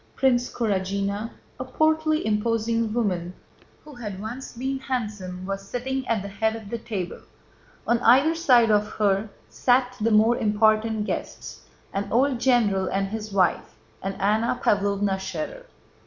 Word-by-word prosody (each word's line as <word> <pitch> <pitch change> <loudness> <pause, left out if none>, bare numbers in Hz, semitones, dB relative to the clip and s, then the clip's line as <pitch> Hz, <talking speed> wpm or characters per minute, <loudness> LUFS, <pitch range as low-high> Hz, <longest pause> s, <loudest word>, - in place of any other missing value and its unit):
Princess 250 -2 +2
Kurágina, 200 0 -1 0.3
a - - -2
portly 315 +3 +1
imposing 230 +1 0
woman 185 -6 -1 0.5
who 300 - -12
had 210 -6 -7
once 235 +6 -7
been 265 +3 -3
handsome, 210 -9 -4
was 195 0 -3
sitting 265 +1 -3
at 220 -4 0
the - - -5
head 220 +3 -1
of 220 -3 -9
the 235 - -3
table. 200 -6 -5 0.7
On 235 0 +2
either 265 +7 +5
side 250 -9 +4
of 210 0 +3
her 205 0 +1 0.2
sat 250 0 +1
the 225 - +2
more 220 +2 +4
important 215 0 +2
guests—an 200 -2 -6
old 255 +1 +2
general 225 -7 +2
and 195 0 -1
his 215 0 -5
wife, 185 -3 +1 0.3
and 195 0 -4
Anna 220 +4 +1
Pávlovna 200 -1 +1
Schérer. 190 - -5
220 Hz, 140 wpm, -25 LUFS, 200-245 Hz, 0.7 s, either